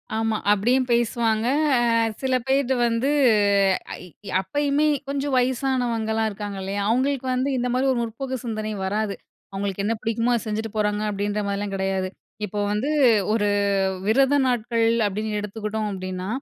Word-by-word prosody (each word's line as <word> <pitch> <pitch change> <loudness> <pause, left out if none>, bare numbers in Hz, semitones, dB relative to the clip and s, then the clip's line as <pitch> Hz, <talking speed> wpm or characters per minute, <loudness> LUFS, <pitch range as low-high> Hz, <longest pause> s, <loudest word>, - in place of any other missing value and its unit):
ஆமா. 220 -1 0
அப்பிடியும் 245 +6 +2
பேசுவாங்க. 230 -1 +1 0.3
அ - - +3 0.4
சில 260 -1 +1
பேர் 270 -1 +2 0.2
வந்து 235 +4 0 0.9
ஐ - - -10 0.4
அப்பயுமே 290 +6 0 0.2
கொஞ்சம் 280 0 -2
வயசானவங்கலாம் 245 -4 0
இருக்காங்க 205 -1 -6
இல்லயா! 200 +1 -2
அவுங்களுக்கு 260 +2 +1
வந்து 260 +2 0
இந்த 250 0 0
மாரி 260 +2 +1
ஒரு 240 - -1
முற்போக்கு 255 +3 -4
சிந்தனை 215 -2 -3
வராது. 205 +1 -1 0.4
அவுங்களுக்கு 195 0 -3
என்ன 225 - +1
பிடிக்குமோ! 230 +2 0
அத 230 - -1
செஞ்சுட்டு 220 +1 -3
போறாங்க 210 0 0
அப்பிடின்ற 205 +1 -2
மாரிலாம் 200 0 -3
கிடையாது. 190 -1 -1 0.4
இப்போ 210 +1 -5
வந்து 215 +8 -1 0.4
ஒரு 205 -2 +1 0.6
விரத 270 +6 +4
நாட்கள் 235 -2 +1 0.2
அப்பிடின்னு 210 +1 -2
எடுத்துக்கிட்டோம் 210 +1 -3
அப்பிடின்னா, 185 -1 -5
220 Hz, 140 wpm, -23 LUFS, 205-250 Hz, 0.9 s, விரத